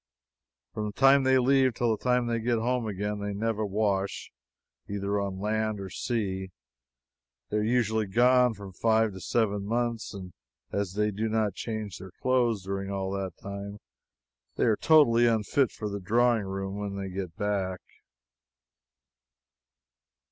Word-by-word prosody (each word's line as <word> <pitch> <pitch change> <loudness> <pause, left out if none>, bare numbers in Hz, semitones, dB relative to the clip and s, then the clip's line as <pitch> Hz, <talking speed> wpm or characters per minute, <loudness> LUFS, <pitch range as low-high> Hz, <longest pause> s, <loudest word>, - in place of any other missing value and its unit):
From 105 0 -3
the 105 - -6
time 135 +3 +6
they 130 0 +4
leave 130 -1 +3
till 115 -2 +1
they 120 0 +1
get 120 +1 +1
home 120 0 0
again, 105 +1 -3
they 100 0 -3
never 110 +1 -1
wash, 100 -1 -1 0.6
either 100 0 -1
on 100 -1 -3
land 110 +1 -1
or 95 -1 -7
sea. 95 -6 -2 1.0
They 105 - +1
are - - +2
usually 110 -2 +1
gone 125 +3 +4
from 100 -2 -10
five 110 +1 +2
to 95 - -8
seven 105 0 0
months, 115 +1 -2
and 90 -3 -8 0.4
as 100 -2 -2
they 105 +1 +1
do 110 +3 -2
not 110 -3 +1
change 110 -3 -5
their 95 -1 -10
clothes 120 -5 +1
during 95 +1 -4
all 95 -1 -2
that 95 -3 -4
time, 100 +1 -6 0.8
they - - 0
are 110 -3 +4
totally 120 -7 +5
unfit 115 +3 +2
for 105 - -5
the 100 0 -4
drawing 115 +3 +2
room 95 +1 -4
when 100 -1 -4
they 100 -1 -4
get 90 -3 -5
back. 100 -3 -2
105 Hz, 150 wpm, -28 LUFS, 100-115 Hz, 1.0 s, time